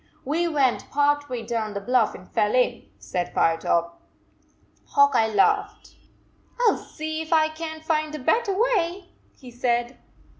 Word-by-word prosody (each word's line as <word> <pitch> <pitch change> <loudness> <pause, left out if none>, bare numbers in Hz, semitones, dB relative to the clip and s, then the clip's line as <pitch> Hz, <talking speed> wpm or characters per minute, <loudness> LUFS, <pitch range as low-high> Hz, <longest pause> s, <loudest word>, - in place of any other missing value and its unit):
".We 325 +5 0
went 280 -6 0
part 290 0 +1
way 245 -2 -4
down 220 -2 -3
the - - -1
bluff 235 +2 +1
and 180 - -13
fell 210 +3 0
in," 250 -2 0
said 180 -1 -4
Firetop. 170 +1 +1 0.9
Hawk 280 0 +4
Eye 225 - +3
laughed. 205 -2 +1 0.3
" - - -35
I 475 -3 +5
ll - - -3
see 315 0 -5
if 320 - -8
I 315 -1 +4
can 315 0 -7
t - - -21
find 310 -1 0
a - - -4
better 400 - 0
way," 385 -6 0 0.3
he 255 -3 -12
said. 240 0 -1
285 Hz, 165 wpm, -24 LUFS, 235-315 Hz, 0.9 s, I